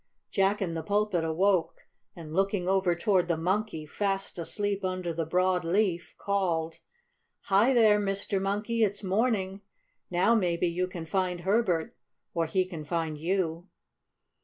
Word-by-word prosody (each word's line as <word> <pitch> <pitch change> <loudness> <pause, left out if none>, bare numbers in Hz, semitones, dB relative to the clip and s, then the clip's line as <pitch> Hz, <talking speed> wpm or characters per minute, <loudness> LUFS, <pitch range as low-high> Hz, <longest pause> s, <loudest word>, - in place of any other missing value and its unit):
Jack 195 +1 +2
in 170 -3 -3
the 165 - -3
Pulpit 205 -2 0
awoke, 175 +2 +1 0.3
and, 160 -3 -9
looking 195 0 0
over 190 -2 +2
toward 185 -1 +2
the 170 -2 0
Monkey, 180 -1 -1
fast 195 +3 -2
asleep 205 +3 -1
under 185 -2 -2
the 165 -1 -3
broad 180 +1 +2
leaf, 175 -2 0
called: 170 -5 -1 0.6
"Hi, 205 +6 +3
there, 215 -3 +5
Mr. 195 -1 -1
Monkey! 210 +4 0
It's 205 0 -1
morning! 195 -1 0 0.5
Now 185 +6 +3
maybe 180 -5 +1
you 180 +2 -1
can 175 -3 -7
find 180 0 -1
Herbert, 190 -4 +1 0.4
or 165 -1 0
he 185 +3 +1
can 170 -4 -7
find 160 0 -2
you!" 170 +1 -2
185 Hz, 145 wpm, -28 LUFS, 170-200 Hz, 0.6 s, there